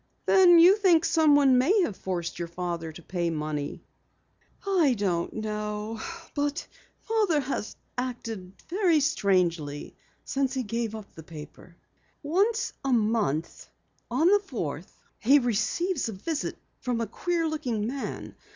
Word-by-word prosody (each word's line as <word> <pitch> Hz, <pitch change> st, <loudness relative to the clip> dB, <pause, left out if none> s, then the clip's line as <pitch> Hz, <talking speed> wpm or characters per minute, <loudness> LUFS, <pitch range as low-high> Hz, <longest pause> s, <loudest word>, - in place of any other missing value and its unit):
"Then 360 Hz, -3 st, +7 dB
you 360 Hz, +5 st, +7 dB
think 355 Hz, -6 st, +4 dB
someone 290 Hz, -5 st, +5 dB
may 380 Hz, -, +4 dB
have 215 Hz, -, -2 dB
forced 175 Hz, -3 st, -4 dB
your 170 Hz, -, -3 dB
father 170 Hz, -1 st, -4 dB
to 165 Hz, +2 st, -12 dB
pay 175 Hz, -1 st, -2 dB
money?" 150 Hz, -2 st, -4 dB, 0.8 s
"I 345 Hz, -10 st, +3 dB
don't 180 Hz, -4 st, -1 dB
know. 210 Hz, 0 st, -4 dB, 0.3 s
But 290 Hz, +1 st, -2 dB, 0.3 s
Father 425 Hz, -9 st, +1 dB
has 265 Hz, -5 st, -4 dB, 0.2 s
acted 225 Hz, -7 st, -5 dB, 0.4 s
strangely 180 Hz, -, +1 dB
ever -, -, -17 dB, 0.3 s
since 270 Hz, -1 st, -1 dB
he 260 Hz, -, -1 dB
gave 230 Hz, 0 st, -3 dB
up 215 Hz, -2 st, -10 dB
the 160 Hz, -, -10 dB
paper. 160 Hz, +2 st, -12 dB, 0.5 s
Once 400 Hz, +10 st, +1 dB
a 270 Hz, -, 0 dB
month, 210 Hz, -, 0 dB, 0.4 s
on 255 Hz, +7 st, +1 dB
the 410 Hz, +2 st, +6 dB
fourth, 180 Hz, -, -6 dB, 0.2 s
he 270 Hz, +6 st, +5 dB
receives 250 Hz, -, 0 dB
a -, -, -5 dB
visit 285 Hz, -, -3 dB, 0.2 s
from 245 Hz, -2 st, -2 dB
a 230 Hz, -, 0 dB
queer 335 Hz, -, -1 dB
looking 255 Hz, -9 st, -2 dB
man. 265 Hz, +4 st, -5 dB
235 Hz, 135 wpm, -27 LUFS, 185-305 Hz, 0.8 s, Then